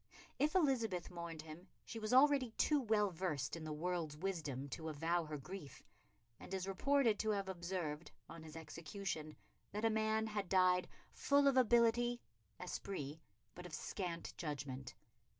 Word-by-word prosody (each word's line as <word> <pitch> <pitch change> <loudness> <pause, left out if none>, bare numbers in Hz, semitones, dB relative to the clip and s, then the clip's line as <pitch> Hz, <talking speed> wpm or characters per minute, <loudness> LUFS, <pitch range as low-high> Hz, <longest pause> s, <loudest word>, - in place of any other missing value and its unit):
If 300 +4 +2
Elizabeth 230 - +2
mourned 170 -3 -6
him 160 +3 -10 0.2
she 230 - -6
was 215 -1 -2
already 270 -1 +6
too 300 -2 +3
well 210 -4 +2
versed 155 -6 -2
in 165 - -6
the 155 - -4
world's 160 -1 -2
wisdom 155 -7 -2
to 160 +5 -4
avow 165 +3 0
her 150 -1 -4
grief, 150 +1 -8 0.6
and - - -11
is 190 0 -3
reported 235 +3 +3
to 220 - +1
have 200 -2 0
observed, 170 -4 -3 0.2
on 165 - -9
his 155 0 -10
execution, 160 0 -5 0.4
that 210 +3 -1
a 225 - +4
man 220 0 +2
had 210 -3 -3
died 180 -1 +4 0.3
full 285 0 +4
of 275 - +5
ability 240 0 +4 0.4
(esprit) 160 -5 -4 0.3
but 180 +1 -8
of 155 - -5
scant 175 -3 -4
judgment. 135 -5 -4
180 Hz, 155 wpm, -39 LUFS, 155-220 Hz, 0.6 s, already